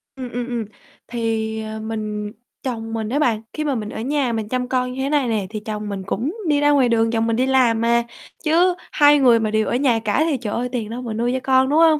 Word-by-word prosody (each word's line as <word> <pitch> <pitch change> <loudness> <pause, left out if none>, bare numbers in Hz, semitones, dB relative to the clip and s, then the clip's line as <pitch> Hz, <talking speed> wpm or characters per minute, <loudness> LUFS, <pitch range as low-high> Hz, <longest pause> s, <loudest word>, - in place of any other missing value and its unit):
Ừm, 255 -2 -7
ừm, 245 0 -3
ừm, 240 -3 -3 0.4
thì, 225 -2 -2
à, 220 0 -6
mình 215 -1 -4 0.3
chồng 225 -3 -4
mình 220 -1 -2
á 275 +5 0
bạn, 230 -7 +1
khi 305 - -2
mà 290 -3 0
mình 215 -2 -4
ở 220 - -5
nhà 270 -1 0
mình 220 -2 -3
chăm 250 0 -1
con 250 -1 0
như 265 - -4
thế 275 - -1
này 290 -3 +2
nè, 215 -4 -1
thì 215 0 -5
chồng 210 0 -5
mình 195 -1 -4
cũng 265 - -3
đi 295 -2 +3
ra 290 0 +4
ngoài 270 -4 +4
đường, 225 -1 +2
chồng 225 0 +1
mình 230 - +1
đi 255 - +2
làm 250 -4 +3
mà. 235 0 +3 0.4
Chứ 350 +3 +3 0.2
hai 290 -1 +5
người 245 -4 +5
mà 215 -1 -1
đều 215 0 +1
ở - - 0
nhà 250 -3 +2
cả 220 +7 +1
thì, 285 - +1
trời 210 -4 -3
ơi, 250 +1 -2
tiền 230 -4 -3
đâu 240 +2 -5
mà 235 -3 -4
nuôi 235 +3 0
cho 260 - 0
con, 265 0 +3
đúng 300 +3 +3
hông? 320 -2 +5
235 Hz, 270 wpm, -21 LUFS, 220-265 Hz, 0.4 s, hai